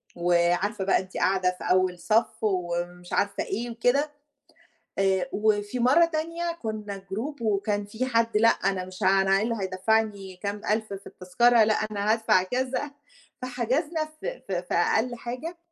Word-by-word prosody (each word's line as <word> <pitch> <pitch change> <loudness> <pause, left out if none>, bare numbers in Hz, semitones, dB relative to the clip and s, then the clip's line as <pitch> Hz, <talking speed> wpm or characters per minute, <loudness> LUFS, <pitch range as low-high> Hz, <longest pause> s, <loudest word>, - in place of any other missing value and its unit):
وعارفة 175 +4 +1
بقى 195 - +3
أنتِ 190 0 -8
قاعدة 185 -1 +2
في - - -7
أول 185 -1 +2
صف 220 +4 +1
ومش 175 -2 -2
عارفة 200 0 0
إيه 240 +2 -3
وكده، 255 +6 +1 0.9
آآ 190 -2 +1
وفي 210 +2 0
مرّة 275 +8 +5
تانية 335 +1 -2
كُنّا 210 -2 -4
group 225 +9 -6
وكان 205 -1 0
فيه 220 +5 -3
حد: 230 -2 +2
"لأ، 230 +1 +6
أنا 190 -1 0
مش 185 +2 -8
ها 195 +1 +5
أنا 195 0 +3
إيه 200 - 0
اللي 230 +1 -1
هيدفّعني 195 0 0
كام 205 0 -3
1000 215 -1 0
في 195 0 -8
التذكرة، 230 +5 +3
لأ، 215 - +3
أنا 215 -1 -1
هادفع،" 220 -5 +3
كذا. 260 +7 -2 0.5
فحجزنا 260 +6 -1
ف 310 0 -14
ف - - -6
في 180 -1 -3
أقل 225 +7 +2
حاجة. 255 +9 -6
210 Hz, 160 wpm, -26 LUFS, 190-240 Hz, 0.9 s, لأ